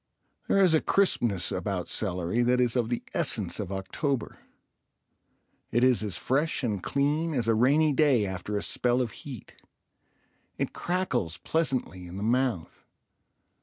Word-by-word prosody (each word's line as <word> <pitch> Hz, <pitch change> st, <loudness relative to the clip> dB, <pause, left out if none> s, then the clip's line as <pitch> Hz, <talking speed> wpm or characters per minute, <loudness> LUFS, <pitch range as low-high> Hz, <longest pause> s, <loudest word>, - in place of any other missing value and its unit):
There 195 Hz, -, +4 dB
is 180 Hz, -4 st, +4 dB
a 160 Hz, -, +4 dB
crispness 120 Hz, -, +2 dB
about 95 Hz, -4 st, -3 dB
celery 90 Hz, +2 st, 0 dB
that 125 Hz, +1 st, +2 dB
is 125 Hz, -1 st, +2 dB
of 120 Hz, -2 st, 0 dB
the 120 Hz, -, -2 dB
essence -, -, +1 dB
of 90 Hz, -, -4 dB
October. 115 Hz, -, -3 dB, 1.3 s
It 120 Hz, +2 st, +1 dB
is 130 Hz, -3 st, +4 dB
as 105 Hz, -5 st, -2 dB
fresh 145 Hz, +3 st, 0 dB
and 105 Hz, -6 st, -1 dB
clean 150 Hz, -, 0 dB
as 120 Hz, -3 st, 0 dB
a 115 Hz, -, +4 dB
rainy 145 Hz, +7 st, +3 dB
day 135 Hz, -7 st, +3 dB
after 95 Hz, +2 st, -4 dB
a 100 Hz, -, -1 dB
spell 125 Hz, 0 st, +1 dB
of 120 Hz, -4 st, -1 dB
heat. 130 Hz, -3 st, -11 dB, 1.0 s
It -, -, -2 dB
crackles 125 Hz, -, -2 dB
pleasantly 130 Hz, -, -1 dB
in 90 Hz, +2 st, -8 dB
the 100 Hz, -, -4 dB
mouth. 120 Hz, -6 st, -1 dB
120 Hz, 150 wpm, -27 LUFS, 100-140 Hz, 1.3 s, There